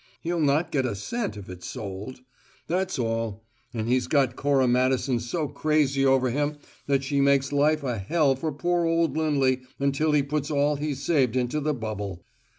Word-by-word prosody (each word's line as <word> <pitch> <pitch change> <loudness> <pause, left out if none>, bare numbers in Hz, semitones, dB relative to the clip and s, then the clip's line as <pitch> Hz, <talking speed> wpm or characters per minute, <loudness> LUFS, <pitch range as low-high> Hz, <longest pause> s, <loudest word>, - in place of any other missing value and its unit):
He'll 170 0 -2
not 150 +3 +2
get 135 -3 +1
a 110 - -3
cent 210 - -3
if 100 - -9
it's 90 -1 -8
sold. 105 +2 -7 0.4
That's 185 +3 -1
all. 115 -3 -2 0.3
And 115 -2 -3
he's 125 +1 +1
got 135 -4 +2
Cora 140 -2 +2
Madison 125 0 +2
so 150 +7 -2
crazy 145 -3 +1
over 130 -2 +3
him 145 +3 -1 0.3
that 140 -1 +2
she 140 +1 0
makes 140 0 +3
life 150 +1 +2
a 125 -5 -2
hell 140 - +2
for 155 +4 -3
poor 175 +4 0
old 165 -1 +1
Lindley 140 -5 +1 0.2
until 140 +3 +1
he 145 -2 +4
puts 145 +1 -2
all 145 0 +2
he's 145 -2 -3
saved 135 -8 +2
into 125 +4 0
the 150 0 -1
bubble. 105 -6 -5
140 Hz, 180 wpm, -26 LUFS, 125-150 Hz, 0.4 s, he